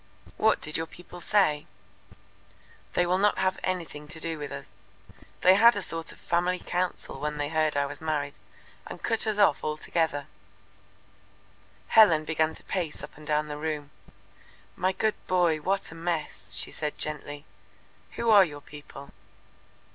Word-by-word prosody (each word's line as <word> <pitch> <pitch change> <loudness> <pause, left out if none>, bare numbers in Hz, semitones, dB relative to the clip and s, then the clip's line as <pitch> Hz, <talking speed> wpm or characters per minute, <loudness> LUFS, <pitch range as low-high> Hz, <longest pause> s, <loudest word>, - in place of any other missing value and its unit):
"What 220 0 +3
did 150 - -2
your 160 0 -3
people 175 +1 -11
say?" 165 -7 +3 1.3
"They 175 - +3
will 180 +2 +2
not 205 +1 +3
have 190 0 +1
anything 165 -5 -3
to 160 - -6
do 165 -1 -3
with 145 -1 -5
us. - - -8 0.7
They 185 - +7
had 230 +4 +7
a 205 - -2
sort 165 0 -2
of - - -10
family 175 +1 +1
council 180 -6 -2
when 150 +1 -2
they 145 0 -2
heard 155 -2 +1
I 140 - +2
was 140 - -7
married, 150 -3 -2 0.5
and - - -9
cut 225 -1 +1
us 215 -1 +1
off 200 -8 +4
altogether." 155 -1 -1 1.6
Helen 170 -9 +6
began 160 0 +1
to - - -10
pace 175 -5 -3
up - - -9
and 150 0 -13
down 150 0 +1
the 150 0 -5
room. 150 -2 -3 0.8
"My 185 +1 +1
good 215 +3 +1
boy, 175 -3 +3
what 195 +3 -1
a - - -8
mess!" 160 - -3
she 100 - -2
said 150 -1 -3
gently. 145 -1 -4 0.7
"Who 230 -1 +1
are 205 -2 +9
your 145 -5 -5
people?" 145 -1 -11
160 Hz, 160 wpm, -28 LUFS, 150-185 Hz, 1.6 s, are